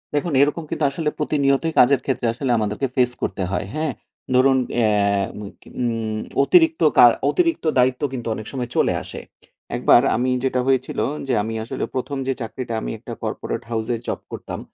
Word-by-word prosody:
দেখুন 150 Hz, +2 st, -1 dB
এরকম 150 Hz, +3 st, +1 dB
কিন্তু -, -, -3 dB
আসলে 150 Hz, +1 st, -1 dB
প্রতিনিয়তই 150 Hz, +1 st, +1 dB
কাজের 130 Hz, +1 st, +5 dB
ক্ষেত্রে 130 Hz, -3 st, -1 dB
আসলে 130 Hz, +2 st, -2 dB
আমাদেরকে 105 Hz, +5 st, -1 dB
ফেস 125 Hz, -2 st, +4 dB
করতে 95 Hz, -, -2 dB
হয়। 90 Hz, +1 st, -1 dB
হ্যাঁ? 155 Hz, -1 st, -1 dB, 0.4 s
ধরুন 130 Hz, +1 st, +5 dB, 0.2 s
অ্যা 110 Hz, -3 st, +3 dB, 0.9 s
উম 115 Hz, -3 st, -1 dB, 0.3 s
অতিরিক্ত 325 Hz, -, +4 dB, 0.2 s
কা -, -, +10 dB, 0.2 s
অতিরিক্ত 335 Hz, -, +1 dB
দায়িত্ব 125 Hz, 0 st, +2 dB
কিন্তু 120 Hz, -3 st, -5 dB
অনেক 110 Hz, -, -7 dB
সময় 125 Hz, -3 st, -4 dB
চলে -, -, +2 dB
আসে। -, -, -7 dB, 0.6 s
একবার 120 Hz, 0 st, +5 dB
আমি 125 Hz, +3 st, 0 dB
যেটা 130 Hz, -1 st, +1 dB
হয়েছিল 130 Hz, -1 st, 0 dB, 0.3 s
যে 130 Hz, -, 0 dB
আমি 115 Hz, +1 st, -4 dB
আসলে 115 Hz, -, -5 dB
১ম 135 Hz, +2 st, -3 dB
যে 135 Hz, -, +1 dB
চাকরিটা 120 Hz, +1 st, -5 dB
আমি -, -, -4 dB
একটা -, -, -8 dB
corporate -, -, -4 dB
house 110 Hz, 0 st, -2 dB
এর -, -, -6 dB
job -, -, -2 dB
করতাম। -, -, -6 dB
130 Hz, 170 wpm, -21 LUFS, 115-140 Hz, 0.9 s, কা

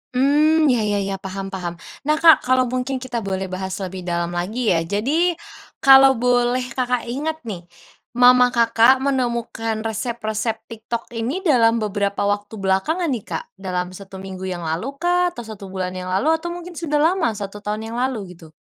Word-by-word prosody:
Mmm, 300 Hz, +2 st, +4 dB
ya 245 Hz, -, +2 dB
ya 205 Hz, 0 st, +1 dB
ya, 195 Hz, 0 st, -2 dB
paham 195 Hz, 0 st, -6 dB
paham. 175 Hz, -3 st, -4 dB, 0.3 s
Nah 305 Hz, -, +4 dB
Kak, 325 Hz, 0 st, +7 dB
kalau 255 Hz, 0 st, +4 dB
mungkin 255 Hz, +1 st, -2 dB
kita 255 Hz, -2 st, -4 dB
boleh 190 Hz, -2 st, -4 dB
bahas 190 Hz, 0 st, -4 dB
lebih 185 Hz, -1 st, -6 dB
dalam 170 Hz, 0 st, -1 dB
lagi 210 Hz, +7 st, -1 dB
ya, 165 Hz, -, +3 dB
jadi, 305 Hz, -, +1 dB, 0.5 s
kalau 270 Hz, 0 st, +8 dB
boleh 245 Hz, +1 st, +2 dB
Kakak 250 Hz, -1 st, -1 dB
ingat 310 Hz, +4 st, -2 dB
nih, 180 Hz, -6 st, -7 dB, 0.5 s
mama 250 Hz, 0 st, +7 dB
Kakak 235 Hz, +3 st, +4 dB
menemukan 235 Hz, -4 st, -1 dB
resep-resep 220 Hz, 0 st, -3 dB
TikTok 230 Hz, +1 st, -5 dB
ini 245 Hz, -, -3 dB
dalam 235 Hz, -8 st, +4 dB
beberapa 200 Hz, -1 st, -1 dB
waktu 205 Hz, +1 st, -1 dB
belakangan 215 Hz, -, 0 dB
nih 235 Hz, -6 st, -3 dB
Kak -, -, -4 dB, 0.2 s
dalam 180 Hz, -1 st, -3 dB
1 190 Hz, +1 st, -11 dB
minggu 190 Hz, 0 st, -7 dB
yang 175 Hz, -2 st, -4 dB
lalu 175 Hz, -, -3 dB
kah? 355 Hz, +3 st, +2 dB
Atau 240 Hz, -9 st, -9 dB
1 210 Hz, -3 st, -9 dB
bulan 185 Hz, -1 st, -4 dB
yang 185 Hz, 0 st, -6 dB
lalu 265 Hz, +14 st, +1 dB
atau 345 Hz, +1 st, -5 dB
mungkin 350 Hz, +1 st, -8 dB
sudah 310 Hz, -3 st, -1 dB
lama 345 Hz, 0 st, +2 dB
1 205 Hz, 0 st, -6 dB
tahun 215 Hz, +2 st, -4 dB
yang 235 Hz, -, -5 dB
lalu 230 Hz, -8 st, -2 dB
gitu? 165 Hz, -2 st, -15 dB
225 Hz, 175 wpm, -21 LUFS, 195-265 Hz, 0.5 s, kalau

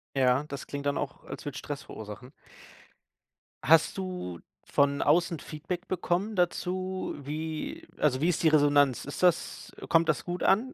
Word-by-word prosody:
Ja, 130 Hz, 0 st, +3 dB
das 140 Hz, -2 st, -7 dB
klingt 140 Hz, 0 st, -5 dB
dann 145 Hz, 0 st, +1 dB
auch, 145 Hz, -, -4 dB
als -, -, -8 dB
würde 145 Hz, -3 st, -4 dB
es -, -, -4 dB
Stress 145 Hz, -2 st, -6 dB
verursachen. 110 Hz, +4 st, -9 dB, 1.3 s
Hast 165 Hz, +4 st, +5 dB
du 180 Hz, -, -4 dB, 0.3 s
von 140 Hz, 0 st, +2 dB
außen 165 Hz, +1 st, +3 dB
Feedback 175 Hz, +5 st, -6 dB
bekommen 185 Hz, +3 st, -1 dB
dazu? 185 Hz, +1 st, -1 dB
Wie 155 Hz, +2 st, -5 dB
also, 135 Hz, -3 st, +2 dB
wie 165 Hz, -, +3 dB
ist 175 Hz, -, 0 dB
die 160 Hz, -, +6 dB
Resonanz? 145 Hz, -3 st, +4 dB
Ist 145 Hz, +5 st, -5 dB
das 180 Hz, -2 st, +1 dB, 0.2 s
kommt 165 Hz, 0 st, +4 dB
das 140 Hz, -6 st, +1 dB
gut 175 Hz, 0 st, -4 dB
an? 250 Hz, +7 st, +3 dB
155 Hz, 160 wpm, -29 LUFS, 140-175 Hz, 1.3 s, die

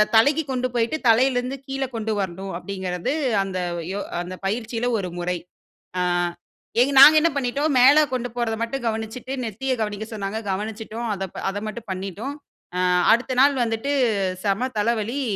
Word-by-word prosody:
தலைக்கு 285 Hz, +8 st, +5 dB
கொண்டு 255 Hz, 0 st, 0 dB
போயிட்டு 235 Hz, +6 st, +1 dB
தலையிலேருந்து 250 Hz, +2 st, +2 dB
கீழ 270 Hz, 0 st, -4 dB
கொண்டு 220 Hz, -1 st, -1 dB
வரணும்." 190 Hz, +1 st, -5 dB
அப்டீங்கிறது 185 Hz, -, -3 dB, 0.3 s
அந்த 190 Hz, -1 st, -4 dB, 0.4 s
யோ 200 Hz, -, -3 dB, 0.2 s
அந்த 185 Hz, +1 st, -7 dB
பயிற்சியில 225 Hz, +3 st, -1 dB
ஒரு 180 Hz, -3 st, -4 dB
முறை. 180 Hz, 0 st, -1 dB, 0.6 s
ஆ -, -, +1 dB, 1.0 s
நாங்க 305 Hz, +2 st, +10 dB
என்ன 335 Hz, -, +4 dB
பண்ணிவிட்டோம். 280 Hz, +3 st, 0 dB
மேல 285 Hz, +4 st, +8 dB
கொண்டு 245 Hz, -1 st, -2 dB
போறத 235 Hz, -2 st, -1 dB
மட்டும் 240 Hz, +1 st, -4 dB
கவனிச்சிட்டு 225 Hz, +4 st, -4 dB
நெத்தியக் 230 Hz, +3 st, -2 dB
கவனிக்க 210 Hz, 0 st, -4 dB
சொன்னாங்க 205 Hz, +1 st, -3 dB
கவனிச்சிட்டோம். 220 Hz, +3 st, -4 dB
அத 195 Hz, -, -4 dB, 0.3 s
அத 205 Hz, -, -5 dB
மட்டும் 220 Hz, -1 st, -7 dB
பண்ணிட்டோம். 195 Hz, +9 st, -5 dB, 0.4 s
அ -, -, 0 dB, 0.3 s
அடுத்த 255 Hz, +2 st, 0 dB
நாள் 280 Hz, 0 st, +5 dB
வந்துட்டு 225 Hz, +5 st, -2 dB, 0.5 s
செம 200 Hz, +5 st, +1 dB
தலைவலி. 230 Hz, +4 st, 0 dB
225 Hz, 145 wpm, -23 LUFS, 200-255 Hz, 1.0 s, நாங்க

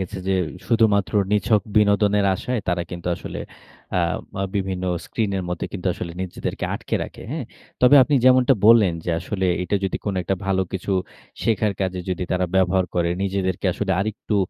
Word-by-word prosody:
গেছে 95 Hz, +1 st, -4 dB
যে 95 Hz, -, +2 dB, 0.3 s
শুধুমাত্র 110 Hz, -4 st, +2 dB, 0.2 s
নিছক 105 Hz, 0 st, +2 dB
বিনোদনের 105 Hz, -1 st, +4 dB
আশায় 125 Hz, +3 st, -2 dB
তারা 90 Hz, -1 st, +1 dB
কিন্তু 85 Hz, -1 st, -7 dB
আসলে -, -, -7 dB, 0.6 s
আ -, -, +3 dB, 0.3 s
মা 95 Hz, -, -2 dB
বিভিন্ন 95 Hz, -1 st, -2 dB, 0.2 s
স্ক্রিনের 100 Hz, -4 st, -2 dB
মধ্যে 90 Hz, -1 st, -3 dB
কিন্তু 95 Hz, -1 st, -5 dB
আসলে 85 Hz, -1 st, -6 dB
নিজেদেরকে 90 Hz, -, -4 dB
আটকে -, -, -4 dB
রাখে, -, -, -11 dB
হ্যাঁ? 150 Hz, -3 st, -3 dB, 0.4 s
তবে 125 Hz, +3 st, +7 dB
আপনি 145 Hz, +3 st, +1 dB
যেমনটা 130 Hz, +1 st, +6 dB
বললেন 110 Hz, -5 st, +7 dB
যে 85 Hz, -, -1 dB
আসলে 95 Hz, +1 st, -2 dB, 0.2 s
এটা 90 Hz, +3 st, 0 dB
যদি 95 Hz, -, -1 dB
কোন 100 Hz, -, -1 dB
একটা 95 Hz, -, 0 dB
ভালো 95 Hz, -1 st, +2 dB
কিছু 95 Hz, +1 st, -2 dB, 0.5 s
শেখার 105 Hz, -1 st, +1 dB
কাজে 95 Hz, -1 st, -1 dB
যদি 90 Hz, 0 st, -2 dB
তারা 90 Hz, 0 st, +1 dB
ব্যবহার 95 Hz, 0 st, +3 dB
করে, 85 Hz, -1 st, +1 dB
নিজেদেরকে 95 Hz, -1 st, -1 dB
আসলে 100 Hz, -2 st, -1 dB
আরেকটু 105 Hz, +1 st, -2 dB
95 Hz, 170 wpm, -22 LUFS, 95-105 Hz, 0.6 s, তবে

